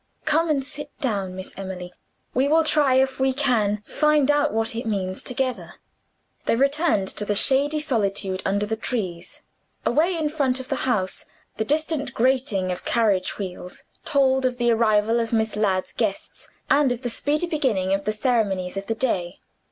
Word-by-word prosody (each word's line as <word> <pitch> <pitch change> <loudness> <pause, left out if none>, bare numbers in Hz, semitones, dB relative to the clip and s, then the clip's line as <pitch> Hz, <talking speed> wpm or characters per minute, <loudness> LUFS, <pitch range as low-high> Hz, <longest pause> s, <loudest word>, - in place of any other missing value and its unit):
"Come, 325 +2 +2
and 275 -3 +1
sit 290 +1 -4
down, 200 -7 -2
Miss 185 0 -5
Emily. 185 -2 -7 0.4
We 260 +3 +2
will 320 +2 +4
try 295 -4 +3
if 265 0 +2
we 265 0 +2
can 220 -7 +1
find 300 -2 +3
out 290 0 +2
what 225 +1 -1
it 235 +1 -4
means, 190 -3 -2
together." 255 0 -3 0.7
They - - +3
returned 275 - +2
to - - -2
the 205 0 -1
shady 280 +7 +4
solitude 200 -9 -1
under 200 +2 0
the 220 +2 -2
trees. 205 -8 -4 0.4
Away, 335 +3 +2
in 310 -2 0
front 275 -4 0
of 260 - -8
the - - 0
house, 190 -6 -1 0.3
the 220 - -1
distant 295 -1 -1
grating 235 -7 +1
of 180 - -5
carriage 205 -6 +1
wheels 180 -2 -6 0.2
told 265 -3 +2
of 250 -1 0
the 240 -1 +2
arrival 225 0 +3
of 230 -1 -2
Miss 220 -1 +1
Ladd's 195 -3 0
guests, 215 -4 -3 0.2
and 280 -2 +3
of 245 0 -4
the 245 - -1
speedy 300 +7 0
beginning 245 - 0
of 195 0 -1
the 215 - +1
ceremonies 210 -6 0
of 195 0 -5
the 225 - -1
day. 185 -8 -1
235 Hz, 175 wpm, -23 LUFS, 200-275 Hz, 0.7 s, will